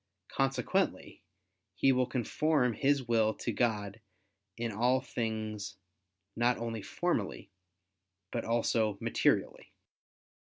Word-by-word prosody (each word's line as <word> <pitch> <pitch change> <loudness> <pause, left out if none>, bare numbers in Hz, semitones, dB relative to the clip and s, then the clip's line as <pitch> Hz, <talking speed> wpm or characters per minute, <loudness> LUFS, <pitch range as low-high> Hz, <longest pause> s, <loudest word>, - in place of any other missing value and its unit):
Consequently 135 0 0 0.5
he 135 - +4
will 125 -1 +2
conform 130 +1 +1
his 140 0 +1
will 110 -2 +3
to 120 - -3
God 105 -2 -1 0.6
in 115 -1 -2
all 120 +5 +2
things 110 -5 -4 0.6
not 120 +1 +2
only 115 -1 -4
formally, 95 - -2 0.8
but - - -2
also 115 -2 +1
materially. - - 0
115 Hz, 95 wpm, -32 LUFS, 110-125 Hz, 0.8 s, he